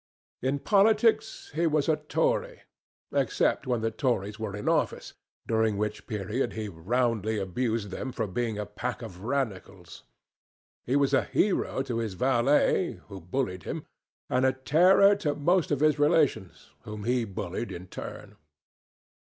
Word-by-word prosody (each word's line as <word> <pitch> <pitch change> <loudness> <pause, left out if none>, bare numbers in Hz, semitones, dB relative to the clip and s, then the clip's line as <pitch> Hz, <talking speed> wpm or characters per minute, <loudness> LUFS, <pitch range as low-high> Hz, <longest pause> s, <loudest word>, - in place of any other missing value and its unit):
In 130 +2 0
politics 220 +5 +2
he 165 +2 +1
was 150 -2 +1
a 155 -2 +3
Tory, - - -1 0.5
except 140 - +1
when 120 -3 0
the 115 0 0
Tories 110 -4 -1
were 105 -3 -4
in 105 - -6
office, - - 0 0.3
during 110 -2 +1
which 105 0 -3
period 105 +3 -2
he 110 -1 -4
roundly 110 +4 -1
abused 105 +2 -2
them 130 +7 -4
for 115 -3 -2
being 110 +2 -2
a 105 - -3
pack 115 +4 -5
of 95 -5 -9
Radicals. 100 -8 -4 0.9
He 130 - +1
was 140 -1 +2
a 135 - +3
hero 195 -8 0
to 120 -4 -3
his 110 -4 -3
valet, 135 - +2 0.2
who 100 -2 -8
bullied 90 0 -2
him, - - -5 0.4
and 125 +1 +1
a 130 0 +4
terror 180 +10 +5
to 150 -8 -1
most 170 +4 +2
of 145 -2 0
his 155 -1 +3
relations, 145 - +1
whom 105 -1 -7
he 120 +2 +1
bullied 100 +1 -5
in 90 +1 -7
turn. - - -9
120 Hz, 150 wpm, -28 LUFS, 105-145 Hz, 0.9 s, terror